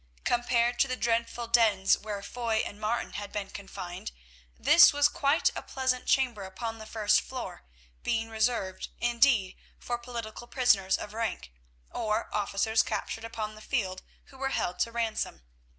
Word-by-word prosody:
Compared 240 0 +1
to 275 - +4
the 255 - -1
dreadful 235 0 0
dens 220 -5 +4
where 205 -2 -6
Foy 230 -2 -1
and 205 +1 -8
Martin 220 +3 -1
had 205 -1 -5
been 205 -2 -4
confined 185 - -7 0.5
this - - +8
was 290 0 +4
quite 290 +3 +2
a - - -3
pleasant 260 -1 -1
chamber 250 -6 +2
upon 225 +4 -5
the 220 - -9
first 210 -1 +3
floor, 255 - -7 0.4
being 225 -1 0
reserved, 220 -4 -1
indeed, 240 -5 +3 0.2
for 240 0 -3
political 235 -1 -7
prisoners 205 -8 +3
of 210 - -7
rank, 220 - -3 0.4
or 220 -1 -2
officers 210 +2 +2
captured 225 - -3
upon 220 -2 -4
the 215 - -13
field 190 -8 -2 0.3
who 265 - -15
were 270 0 0
held 180 -8 -2
to 230 - +1
ransom. 230 - -2
225 Hz, 155 wpm, -29 LUFS, 205-240 Hz, 0.5 s, this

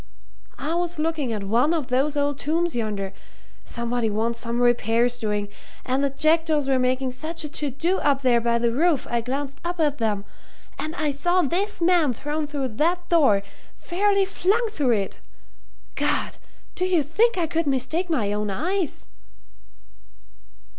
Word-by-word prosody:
"I 305 +3 -3
was 350 0 -1
looking 305 -5 -1
at 210 -3 -3
one 240 +11 +2
of 295 -6 -3
those 275 +4 +1
old 285 -1 0
tombs 335 +2 0
yonder 205 -4 -2 0.5
somebody 235 -1 -2
wants 230 +2 -1
some 235 0 -3
repairs 240 0 +2
doing 210 -2 -1 0.4
and 260 +2 0
the 280 - +2
jackdaws 310 0 +2
were 265 -1 +2
making 255 +1 +1
such 315 +6 -3
a 300 - -5
to 295 0 -2
do 335 +8 0
up 280 -1 +1
there 240 -2 +4
by 235 0 +2
the 235 0 +1
roof 310 +4 +2
I 235 -1 +1
glanced 275 +3 -4
up 345 0 -3
at 295 -3 +1
them. 210 -3 -1 0.5
And 310 +2 -4
I 305 -4 0
saw 350 +6 +1
this 365 +5 -1
man 335 -6 +4
thrown 295 +5 -3
through 280 -3 -3
that 345 +9 0
door 270 - +4 0.3
fairly 395 +2 +1
flung 400 +5 +1
through 275 - +1
it! 200 -3 -2 0.7
God! - - -1 0.4
do 365 - -1
you 360 -5 +2
think 420 - +2
I 345 - +2
could 325 0 -1
mistake 280 +7 0
my 220 -11 0
own 210 0 -1
eyes?" 345 - -2
285 Hz, 165 wpm, -24 LUFS, 240-335 Hz, 0.7 s, there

